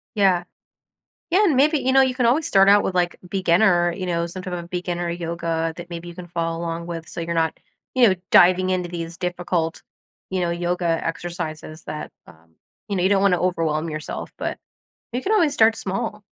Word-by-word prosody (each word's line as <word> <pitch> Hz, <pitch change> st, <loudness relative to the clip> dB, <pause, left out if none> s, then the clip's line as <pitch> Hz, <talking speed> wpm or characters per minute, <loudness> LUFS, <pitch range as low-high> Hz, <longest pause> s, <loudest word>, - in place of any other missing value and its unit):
Yeah. 190 Hz, -4 st, +3 dB, 0.9 s
Yeah. 380 Hz, +5 st, +4 dB
And 320 Hz, -9 st, +3 dB
maybe, 300 Hz, +4 st, +4 dB
you 260 Hz, -1 st, 0 dB
know, 270 Hz, 0 st, +6 dB
you 260 Hz, -1 st, +1 dB
can 250 Hz, -2 st, +1 dB
always 280 Hz, +7 st, +2 dB
start 195 Hz, 0 st, +5 dB
out 205 Hz, +1 st, +7 dB
with, 185 Hz, -, -2 dB
like, 175 Hz, -1 st, +1 dB
beginner, 175 Hz, -1 st, +3 dB
you 185 Hz, +2 st, -5 dB
know, 170 Hz, -1 st, 0 dB
some 185 Hz, +2 st, -7 dB
type 185 Hz, -, -6 dB
of 170 Hz, -1 st, -5 dB
beginner 175 Hz, -1 st, -3 dB
yoga 165 Hz, -1 st, -2 dB
that 175 Hz, 0 st, -8 dB
maybe 170 Hz, 0 st, -6 dB
you 175 Hz, -, -9 dB
can 180 Hz, 0 st, -9 dB
follow 165 Hz, -1 st, -2 dB
along 170 Hz, 0 st, -4 dB
with 165 Hz, -1 st, -6 dB
so 175 Hz, -, -6 dB
you're 170 Hz, 0 st, -3 dB
not, 160 Hz, -1 st, 0 dB, 0.4 s
you 255 Hz, -2 st, +6 dB
know, 190 Hz, -, +4 dB, 0.2 s
diving 185 Hz, +1 st, +6 dB
into 180 Hz, -1 st, -1 dB
these 170 Hz, -1 st, -6 dB
difficult, 175 Hz, -2 st, -2 dB, 0.5 s
you 185 Hz, -1 st, -1 dB
know, 175 Hz, -1 st, 0 dB
yoga 175 Hz, +1 st, -2 dB, 0.2 s
exercises 165 Hz, -2 st, -5 dB
that, 150 Hz, -, -6 dB, 0.2 s
um 80 Hz, -1 st, -19 dB, 0.3 s
you 200 Hz, -, -1 dB
know, 180 Hz, -, 0 dB
you 185 Hz, -, +4 dB
don't 195 Hz, -1 st, +3 dB
wanna 185 Hz, -3 st, +3 dB
overwhelm 165 Hz, -3 st, 0 dB
yourself, 155 Hz, -1 st, -5 dB
but -, -, -4 dB, 0.5 s
you 245 Hz, -, -2 dB
can 415 Hz, -, 0 dB
always 335 Hz, -9 st, +3 dB
start 225 Hz, 0 st, +4 dB
small. 205 Hz, +2 st, -4 dB
175 Hz, 205 wpm, -22 LUFS, 170-195 Hz, 0.9 s, out